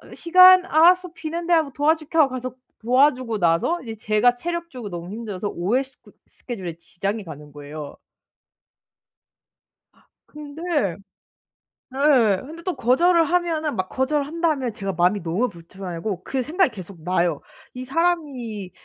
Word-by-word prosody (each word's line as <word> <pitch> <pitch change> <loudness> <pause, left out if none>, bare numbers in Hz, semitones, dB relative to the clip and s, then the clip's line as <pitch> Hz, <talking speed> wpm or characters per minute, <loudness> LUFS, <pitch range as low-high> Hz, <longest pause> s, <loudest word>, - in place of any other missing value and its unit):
시간? 365 +1 +7
알았어. 360 +3 +4
비는데." 335 +2 -5
하고 315 -4 +2
"도와줄게." 310 +2 0
하고 290 -4 +5
가서 255 -1 -5 0.3
도와주고 250 -3 +2
나서 170 - +1
이제 225 -2 -7
제가 215 +3 +2
체력적으로 335 -7 -5
너무 175 +2 -7
힘들어서 210 -3 -5
오후에 205 +10 0
스 265 -1 -18
그 - - -18 0.2
스케줄에 185 -9 -7
지장이 195 +5 -4
가는 150 -2 -10
거예요. 145 0 -9 2.0
아 - - -30 0.2
근데 300 +1 -11 1.3
네. 260 -8 +3
근데 320 +5 -11
또 365 - -2
거절을 335 +8 +3
하면은 325 -3 0
막 185 0 -2
거절을 280 +2 0
한다 335 +2 -1
하면 255 -6 -3
제가 195 -2 -4
마음이 180 +4 +2
너무 180 +9 0
불편 185 +1 -12
하고 180 +2 -4
그 265 -1 -2
생각이 345 +7 +1
계속 185 -4 -11
나요. 175 -3 0 0.3
'이 255 - -6
사람이 265 - -2
250 Hz, 320 characters per minute, -22 LUFS, 195-315 Hz, 2.0 s, 시간